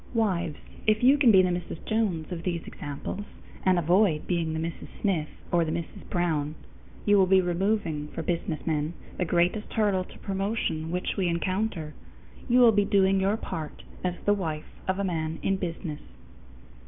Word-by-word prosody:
Wives, 180 -8 +1 0.3
if 215 +2 +3
you 265 +3 +7
can 280 -4 +5
be 190 -2 +7
the 180 - +2
Mrs. 175 -2 -5
Jones 200 -8 0
of 170 -2 -4
these 170 -2 -2
examples, 145 +7 -5 0.4
and 185 -1 +4
avoid 175 -1 +3
being 170 -3 0
the 160 - -2
Mrs. 165 0 -4
Smith 175 -7 +1 0.2
or 175 -1 +4
the 160 - -2
Mrs. 170 0 -5
Brown, 155 -4 0 0.5
you 205 -1 +5
will 190 - +5
be 190 0 +6
removing 175 -4 0
for 165 - -5
businessmen 160 -2 -1 0.3
the 180 - +2
greatest 175 +5 +1
hurdle 205 -4 +2
to - - -14
promotion 195 -5 -2
which 180 +4 -2
we 190 -2 +1
encounter. 175 -2 -1 0.6
You 250 +1 +6
will 235 -2 +8
be 205 -1 +3
doing 195 -1 +3
your 195 +3 +2
part 160 -8 -6 0.2
as 180 -1 0
the 205 - +5
wife 160 -6 -3 0.2
of 190 0 +1
a 200 - -1
man 160 -3 -2
in 195 - +2
business. 170 -4 -4
180 Hz, 175 wpm, -27 LUFS, 165-200 Hz, 0.6 s, will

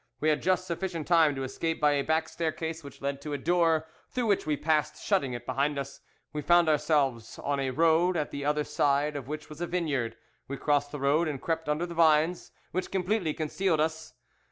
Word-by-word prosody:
We 155 - +2
had 150 - +1
just 185 0 +1
sufficient 170 -2 -3
time 165 -4 +4
to 135 - -3
escape 160 +5 -2
by 150 -1 +4
a 145 -1 +2
back 160 +1 +1
staircase 160 0 -3
which 140 -1 -12
led 140 0 -2
to 150 0 -5
a - - -1
door, 165 +1 +2 0.2
through 250 -2 -2
which 200 -7 +1
we 150 -1 +1
passed, 150 0 0
shutting 165 -11 0
it 120 0 -6
behind 145 +3 0
us. 140 0 -5 0.3
We 150 - -2
found 175 +2 +4
ourselves 140 -6 +1
on 140 0 -2
a 135 -1 0
road, 165 +5 +3
at 150 - -2
the 140 - -5
other 150 +1 +1
side 145 0 +1
of 135 -3 -5
which 150 +1 -5
was 150 +2 -10
a 175 - -1
vineyard. 145 -10 -1 0.3
We 140 - -5
crossed 145 0 +1
the 145 - -5
road 145 +5 +2
and 145 -3 -3
crept 160 0 -2
under 150 +3 0
the 170 - -7
vines, 160 +1 +3 0.2
which 185 0 -2
completely 185 -3 0
concealed 160 +2 0
us. 155 -2 -2
155 Hz, 215 wpm, -28 LUFS, 145-165 Hz, 0.3 s, time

